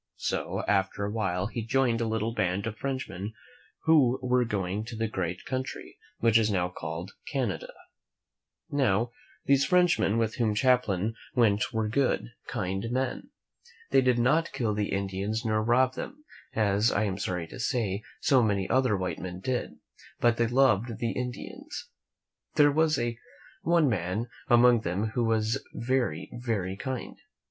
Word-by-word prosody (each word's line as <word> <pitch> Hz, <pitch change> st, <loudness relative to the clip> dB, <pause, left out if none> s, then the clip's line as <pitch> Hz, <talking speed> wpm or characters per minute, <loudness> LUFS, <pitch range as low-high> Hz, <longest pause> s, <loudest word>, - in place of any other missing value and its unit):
So, -, -, -2 dB
after 100 Hz, 0 st, +1 dB
a 100 Hz, -, -3 dB
while, 95 Hz, -4 st, -1 dB
he 115 Hz, +3 st, -3 dB
joined 120 Hz, -1 st, +1 dB
a 115 Hz, -, 0 dB
little 110 Hz, +1 st, -1 dB
band 100 Hz, -2 st, 0 dB
of 115 Hz, -1 st, -3 dB
Frenchmen 110 Hz, -6 st, -4 dB, 0.5 s
who 140 Hz, -6 st, +5 dB
were 125 Hz, 0 st, +3 dB
going 100 Hz, -1 st, -2 dB
to 115 Hz, -, -7 dB
the 115 Hz, 0 st, -1 dB
great 90 Hz, -4 st, -3 dB
country 130 Hz, 0 st, -5 dB, 0.2 s
which 115 Hz, -1 st, +4 dB
is 110 Hz, -1 st, +2 dB
now 90 Hz, -3 st, +1 dB
called 85 Hz, +2 st, -6 dB, 0.2 s
Canada. 130 Hz, -8 st, -2 dB, 1.0 s
Now, 120 Hz, -4 st, +2 dB, 0.3 s
these 140 Hz, 0 st, +4 dB
Frenchmen 175 Hz, -, +3 dB
with 115 Hz, -1 st, 0 dB
vvhom 110 Hz, -4 st, +1 dB
Champlain 115 Hz, -5 st, +2 dB, 0.2 s
went 110 Hz, -2 st, +3 dB
were 110 Hz, -2 st, 0 dB
good, 125 Hz, +1 st, 0 dB, 0.2 s
kind 95 Hz, -1 st, -2 dB
men. 130 Hz, +1 st, -2 dB, 0.6 s
They 135 Hz, -, +6 dB
did 125 Hz, -1 st, +3 dB
not 150 Hz, +8 st, +2 dB
kill 120 Hz, -6 st, 0 dB
the 105 Hz, -1 st, -1 dB
Indians 100 Hz, +4 st, -2 dB
nor 110 Hz, -1 st, +2 dB
rob 125 Hz, +3 st, +3 dB
them, 300 Hz, +3 st, -7 dB, 0.3 s
as, 105 Hz, 0 st, +3 dB
I 105 Hz, -, +1 dB
am 100 Hz, -2 st, -2 dB
sorry 90 Hz, -2 st, -2 dB
to -, -, -9 dB
say, 115 Hz, -6 st, -1 dB, 0.2 s
so 135 Hz, -3 st, +4 dB
many 100 Hz, -4 st, +1 dB
other 130 Hz, -5 st, +2 dB
white 95 Hz, -1 st, -3 dB
men 90 Hz, 0 st, -6 dB
did, 125 Hz, +6 st, -2 dB, 0.4 s
but 120 Hz, -1 st, +3 dB
they 120 Hz, -, +2 dB
loved 120 Hz, -3 st, +3 dB
the 115 Hz, -1 st, -1 dB
Indians. 125 Hz, -1 st, -6 dB, 0.7 s
There 145 Hz, -1 st, +6 dB
was 160 Hz, +1 st, +3 dB, 0.6 s
one 170 Hz, -2 st, +3 dB
man 105 Hz, +2 st, -1 dB, 0.2 s
among 120 Hz, -1 st, +6 dB
them 100 Hz, +3 st, -1 dB
who 120 Hz, +1 st, 0 dB
was 115 Hz, +3 st, +1 dB
very, 120 Hz, -10 st, -1 dB
very 110 Hz, -6 st, -2 dB
kind. 130 Hz, +4 st, -5 dB
115 Hz, 155 wpm, -28 LUFS, 100-125 Hz, 1.0 s, They